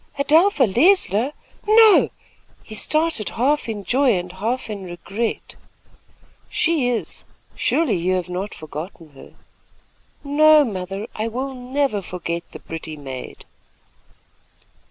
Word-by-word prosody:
"Adelpha 310 +3 +4
Leisler! 245 - +3 0.4
No 435 -1 +6 0.3
" - - -33
He 220 - -11
started, 310 -1 +1
half 275 +2 +1
in 210 -2 -4
joy 260 +3 +3
and 180 0 -5
half 225 +8 -3
in 205 -3 -6
regret. 195 +6 -4 0.9
"She 315 -7 +1
is. 240 -2 -3 0.3
Surely, 290 - +1
you 180 +2 0
have 180 -1 -2
not 185 +3 -5
forgotten 155 +1 -9
her." 135 - -15 0.9
"No, 300 +1 +5
mother. 195 -1 -5
I 215 +1 -3
will 260 +4 -4
never 255 -3 -1
forget 170 -2 -5
the - - -9
pretty 160 -1 -7
maid." 135 -3 -8
225 Hz, 120 wpm, -21 LUFS, 180-285 Hz, 0.9 s, No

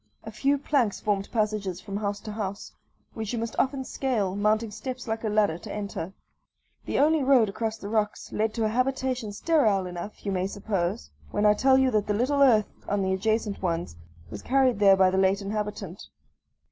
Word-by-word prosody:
A 220 - -7
few 275 +6 +1
planks 270 -7 0
formed 200 -2 -1
passages 210 -5 -1
from 200 +1 -5
house 205 -1 -2
to 215 - -7
house, 200 -2 -5 0.4
which 220 0 -4
you - - -1
must 230 0 -3
often 270 0 0
scale, 225 -9 -1
mounting 215 +2 +1
steps 255 +3 -6
like 220 0 -3
a 220 - 0
ladder 205 -6 +2
to - - -9
enter. 200 -4 -5 0.7
The - - -2
only 310 +1 +4
road 260 -5 +4
across 220 +2 -3
the 200 - -8
rocks 210 -1 -1
leads 215 0 -1
to 225 -2 0
a - - +1
habitation 255 -1 -1
sterile 210 - +2
enough, 180 +4 -7
you 200 - -1
may 185 0 0
suppose, 185 - -3 0.2
when 210 - 0
I 210 - +7
tell 260 +5 +4
you 265 -1 +3
that 210 -3 +1
the 210 - +1
little 275 +6 +1
earth 225 -6 +4 0.2
on 205 -1 +1
the 190 0 +1
adjacent 215 +1 -1
ones 165 - -2 0.4
was 105 -1 -7
carried 260 -4 +2
there 195 -2 +6
by 190 -1 +5
the 190 - +1
late 190 +1 +3
inhabitant. 205 -2 -5
210 Hz, 195 wpm, -26 LUFS, 195-240 Hz, 0.7 s, I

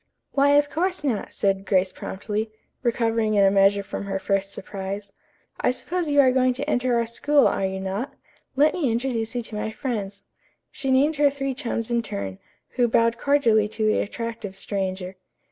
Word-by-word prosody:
"Why, 285 +1 +4
of 290 0 +4
course 360 0 -1
not," 245 -8 -1
said 195 -1 0
Grace 185 -1 +2
promptly, 210 +4 -4 0.3
recovering 225 -3 +1
in 200 -1 +5
a 195 - +5
measure 200 0 +4
from 200 - -5
her 195 -1 -2
first 195 +1 -1
surprise. 200 +1 -6 0.5
"I - - +2
suppose 335 +6 -2
you 285 0 +3
are 260 -2 +5
going 255 0 +3
to 275 +3 -4
enter 250 -3 +1
our 235 - +1
school, 280 +5 +3
are 195 - 0
you 190 0 -4
not? 195 +8 -4 0.4
Let 295 +3 +4
me 295 -10 0
introduce 230 -1 -2
you 240 - -1
to 220 - -8
my 210 +1 -2
friends." 210 -5 -4 0.5
She 275 -1 -4
named 280 +4 +3
her 290 0 +5
three 275 -1 -3
chums 235 -2 -3
in 235 0 +2
turn, 100 - -5 0.3
who 245 -1 +1
bowed 230 0 +2
cordially 235 -7 +3
to 220 +1 -2
the 215 - +3
attractive 225 -2 -4
stranger. 190 -1 -3
230 Hz, 185 wpm, -24 LUFS, 200-265 Hz, 0.5 s, in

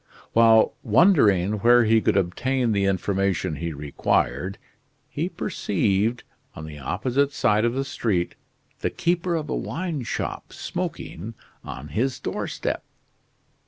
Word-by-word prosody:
While 115 -1 +5
wondering 110 - +4
where 120 +3 +6
he 110 0 +4
could - - +2
obtain 120 +7 0
the 100 -2 +1
information 95 -4 0
he 85 +2 -3
required, 75 +3 -1 0.5
he - - -2
perceived, 105 +5 0 0.3
on 80 - -7
the 75 -2 -9
opposite 125 - 0
side 105 -4 +2
of 120 +1 0
the 135 +1 -1
street, 95 -9 -1 0.5
the - - 0
keeper 175 0 0
of 155 -2 -2
a - - -2
wine 165 -5 -3
shop 115 - -4
smoking 105 +8 -5 0.3
on 70 +4 -8
his 120 - -1
doorstep. - - -3
110 Hz, 125 wpm, -24 LUFS, 90-130 Hz, 0.5 s, where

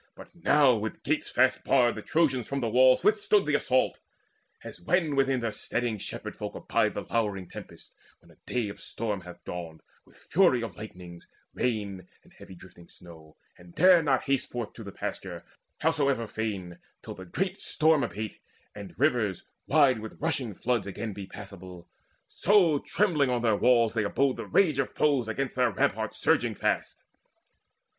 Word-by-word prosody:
But - - -14
now 150 -6 +4
with 110 +1 -5
gates - - -1
fast - - +2
barred 125 -3 +3
The - - -7
Trojans 135 -8 +1
from 140 - -2
the 120 -3 -1
walls 130 +2 +5
withstood 210 -1 +3
the 150 - 0
assault. 130 -3 +1 0.6
As - - -10
when 155 - +1
within 135 -2 +2
their 115 -1 -1
steading 115 +1 -2
shepherd - - -7
folk - - -6
Abide - - 0
the - - -2
lowering 105 -5 -2
tempest, - - -12 0.2
when - - -22
a - - -22
day 120 -4 0
Of 100 - -10
storm 105 -4 -4
hath 90 -1 -12
dawned, 85 -3 -7 0.2
with - - -22
fury 155 -9 +2
of 105 -7 -6
lightnings, 90 -4 -11 0.3
rain 100 -7 -2 0.2
And - - -22
heavy 95 - -13
drifting 85 -1 -15
snow, 80 -3 -15 0.2
and 90 -1 -16
dare 180 0 +6
not 140 -4 +1
haste 135 -1 -1
Forth 120 -3 -5
to 115 - -10
the 100 - -8
pasture, - - -6 0.4
howsoever 140 -7 +1
fain, 100 -6 -5 0.2
Till - - -7
the 95 - -10
great 180 - -3
storm 155 -2 +2
abate, 105 0 -5 0.3
and 100 -2 -10
rivers, 120 - +1 0.2
wide 140 -5 +4
With 110 0 -9
rushing 140 - -1
floods, 120 -2 -1
again 105 +2 -5
be 100 -1 -8
passable; 95 -3 -11 0.4
So 180 -7 +3
trembling 155 -10 +1
on 120 -1 0
their 110 -3 +3
walls 115 0 +3
they 110 -2 0
abode 130 +6 +1
the - - -6
rage 160 -8 +3
Of 135 - -2
foes 140 -6 +2
against 130 +4 -2
their 125 -1 +2
ramparts - - -1
surging - - +1
fast. - - -2
120 Hz, 175 wpm, -28 LUFS, 100-140 Hz, 0.6 s, dare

